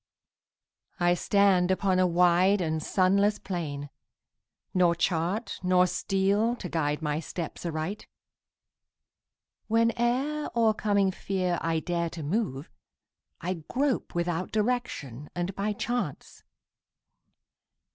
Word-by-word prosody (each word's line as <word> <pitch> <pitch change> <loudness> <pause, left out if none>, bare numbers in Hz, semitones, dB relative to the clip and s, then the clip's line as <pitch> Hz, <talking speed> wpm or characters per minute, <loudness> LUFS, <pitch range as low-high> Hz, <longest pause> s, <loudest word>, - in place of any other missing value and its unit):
I 175 0 +4
stand 190 -1 +3
upon 190 0 +2
a 185 - +4
wide 180 +3 +4
and 160 -3 -1
sunless 200 +5 +2
plain, 145 -6 -5 0.8
Nor 175 -2 +4
chart 175 +6 -1
nor 180 0 +4
steel 200 +5 +1
to 200 - -6
guide 155 -2 -1
my 150 0 0
steps 170 +1 -5
aright. 160 +5 -4 1.6
Whene'er, 240 +6 +1
o'ercoming 210 -4 +2
fear, 185 -3 -1
I 165 -1 0
dare 170 -1 -1
to 165 -1 -7
move, 155 - -2 0.7
I 180 -1 -3
grope 270 -6 -1
without 175 +1 -1
direction 205 - -2
and 175 +2 -2
by 200 +3 -1
chance. 240 +4 -4
185 Hz, 105 wpm, -28 LUFS, 170-205 Hz, 1.6 s, I